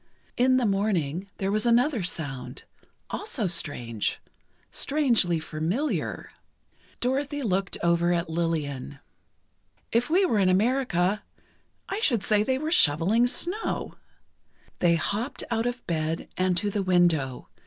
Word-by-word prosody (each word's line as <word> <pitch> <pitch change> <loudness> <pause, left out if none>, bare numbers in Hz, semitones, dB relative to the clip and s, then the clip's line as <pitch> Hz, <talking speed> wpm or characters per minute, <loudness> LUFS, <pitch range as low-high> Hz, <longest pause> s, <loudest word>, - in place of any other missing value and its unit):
In 255 +1 +3
the 250 - +1
morning, 195 -4 -1
there 195 0 -1
was 215 +3 0
another 245 +1 +3
sound—also 170 - -5
strange—strangely 170 - 0
familiar. 165 - -2 0.7
Dorothy 280 +3 -1
looked 195 -3 -1
over 170 0 +2
at 170 -1 0
Lillian. 155 -5 -3 0.9
"If 240 +4 +1
we 370 +4 +4
were 225 - +1
in 190 -2 +3
America, 205 -2 +1 0.7
I 395 - -3
should 240 - +1
say 210 -1 +3
they 260 +4 0
were 310 +3 -3
shoveling 200 - +4
snow." 360 - -1 0.9
They 170 -1 +4
hopped 210 - -2
out 230 +1 0
of 245 0 -5
bed, 160 0 -2
and 185 -1 +1
to 205 +3 0
the 205 - -1
window. 170 -8 +1
195 Hz, 120 wpm, -26 LUFS, 170-245 Hz, 0.9 s, we